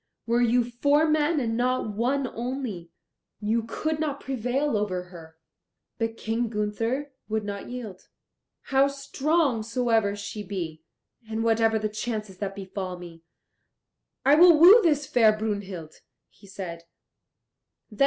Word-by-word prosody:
Were 235 Hz, +1 st, +2 dB
you 240 Hz, +1 st, +3 dB
four 285 Hz, +6 st, +2 dB
men 310 Hz, +1 st, +2 dB
and 225 Hz, -3 st, -1 dB
not 250 Hz, -2 st, 0 dB
one 260 Hz, +5 st, 0 dB
only, 235 Hz, -8 st, -5 dB, 0.5 s
you 220 Hz, +2 st, 0 dB
could 305 Hz, +7 st, -3 dB
not 290 Hz, -3 st, -2 dB
prevail 265 Hz, +1 st, -1 dB
over 195 Hz, -4 st, -1 dB
her." 165 Hz, -3 st, -13 dB, 0.6 s
But 225 Hz, 0 st, -2 dB
King 225 Hz, +1 st, -2 dB
Gunther 225 Hz, +6 st, -2 dB, 0.2 s
would 220 Hz, 0 st, -1 dB
not 200 Hz, -1 st, -6 dB
yield. 230 Hz, -7 st, -8 dB, 0.7 s
"How 270 Hz, +1 st, +5 dB
strong 280 Hz, -1 st, 0 dB
soever 225 Hz, -3 st, +1 dB
she 205 Hz, +1 st, -6 dB
be, 175 Hz, -6 st, -5 dB, 0.5 s
and 225 Hz, 0 st, -2 dB
whatever 225 Hz, -1 st, +3 dB
the 215 Hz, 0 st, -1 dB
chances 215 Hz, -3 st, -5 dB
that 195 Hz, -1 st, -4 dB
befall 190 Hz, -2 st, -5 dB
me, 170 Hz, -2 st, -11 dB, 1.0 s
I 280 Hz, -, +6 dB
will 335 Hz, +1 st, +8 dB
woo 375 Hz, +9 st, +9 dB
this 300 Hz, -5 st, +2 dB
fair 220 Hz, -4 st, +4 dB
Brunhild," 200 Hz, -7 st, -4 dB, 0.4 s
he 200 Hz, -, -19 dB
said. 175 Hz, -4 st, -7 dB
225 Hz, 135 wpm, -26 LUFS, 200-270 Hz, 1.0 s, woo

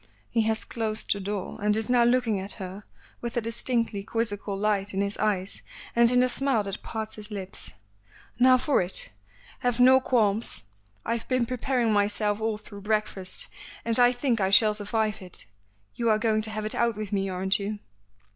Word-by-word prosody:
He 230 Hz, -, +2 dB
has 220 Hz, 0 st, 0 dB
closed 220 Hz, -2 st, -2 dB
the 200 Hz, -, -6 dB
door, 200 Hz, 0 st, -4 dB
and 210 Hz, 0 st, +2 dB
is 220 Hz, 0 st, -1 dB
now 245 Hz, -1 st, +4 dB
looking 240 Hz, -4 st, +2 dB
at 195 Hz, +1 st, -4 dB
her 190 Hz, +2 st, -8 dB, 0.4 s
with 235 Hz, 0 st, -4 dB
a -, -, +5 dB
distinctly 230 Hz, -2 st, -1 dB
quizzical 205 Hz, -2 st, -2 dB
light 205 Hz, -1 st, 0 dB
in 195 Hz, -, +1 dB
his 200 Hz, 0 st, -1 dB
eyes 200 Hz, -3 st, -1 dB, 0.3 s
and 235 Hz, 0 st, +6 dB
in 250 Hz, 0 st, +4 dB
the 255 Hz, -, +4 dB
smile 255 Hz, -3 st, +2 dB
that 195 Hz, 0 st, -5 dB
parts 220 Hz, -1 st, -5 dB
his 210 Hz, 0 st, -10 dB
lips. 195 Hz, -3 st, -5 dB, 0.7 s
"Now 255 Hz, +1 st, +7 dB
for 275 Hz, -1 st, +2 dB
it. 180 Hz, +1 st, 0 dB, 0.5 s
Have 245 Hz, -1 st, 0 dB
no 260 Hz, +1 st, +7 dB
qualms. 225 Hz, -, +1 dB, 0.4 s
I've 230 Hz, -1 st, -2 dB
been 255 Hz, -2 st, +1 dB
preparing 245 Hz, -1 st, 0 dB
myself 205 Hz, +1 st, +1 dB
all 220 Hz, -1 st, 0 dB
through 205 Hz, -1 st, -12 dB
breakfast 210 Hz, -3 st, -1 dB, 0.4 s
and 230 Hz, +1 st, +3 dB
I 245 Hz, 0 st, +6 dB
think 245 Hz, -3 st, 0 dB
I 190 Hz, -, +2 dB
shall 210 Hz, +2 st, +6 dB
survive 210 Hz, 0 st, -1 dB
it. 180 Hz, -2 st, -5 dB, 0.5 s
You 235 Hz, -1 st, 0 dB
are 215 Hz, -, +4 dB
going 215 Hz, -1 st, +1 dB
to 220 Hz, -, 0 dB
have 215 Hz, 0 st, -4 dB
it 215 Hz, -, -1 dB
out 235 Hz, -1 st, +1 dB
with 215 Hz, -2 st, -5 dB
me, 195 Hz, -1 st, 0 dB
aren't 190 Hz, +2 st, 0 dB
you?" 205 Hz, +1 st, -3 dB
215 Hz, 190 wpm, -27 LUFS, 200-235 Hz, 0.7 s, Now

